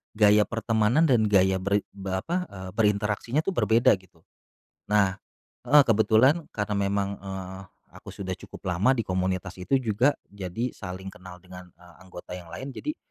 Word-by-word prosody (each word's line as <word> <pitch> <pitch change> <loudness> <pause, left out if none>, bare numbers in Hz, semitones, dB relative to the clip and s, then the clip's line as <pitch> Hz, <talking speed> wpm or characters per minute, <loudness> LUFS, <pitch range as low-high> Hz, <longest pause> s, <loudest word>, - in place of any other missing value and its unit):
gaya 105 0 +5
pertemanan 115 +5 +1
dan 120 -8 +3
gaya 95 -1 +3
berin 100 +2 0
be 95 -1 -5
apa, 175 - -2
eee, 95 -1 -9
berinteraksinya 105 - 0
tuh 195 - -1
berbeda 120 -6 +3
gitu. 85 -3 -25 0.7
Nah 100 -3 +2 0.5
heeh, 145 0 +8
kebetulan 115 +8 +3
karena 105 0 -1
memang, 100 0 0
eee, 95 -1 -7 0.3
aku - - -14
sudah 95 -2 -5
cukup 90 - -7
lama 100 +10 +3
di 115 - 0
komunitas 95 0 -2
itu 115 +9 -1
juga 125 +3 +2 0.2
jadi 100 +5 -4
saling 95 0 -8
kenal 90 -1 -12
dengan, 90 0 -11
eee, 90 0 -18
anggota 90 0 -10
yang 90 -2 -8
lain, 135 +9 -7
jadi 300 - -5
100 Hz, 160 wpm, -26 LUFS, 95-115 Hz, 0.7 s, heeh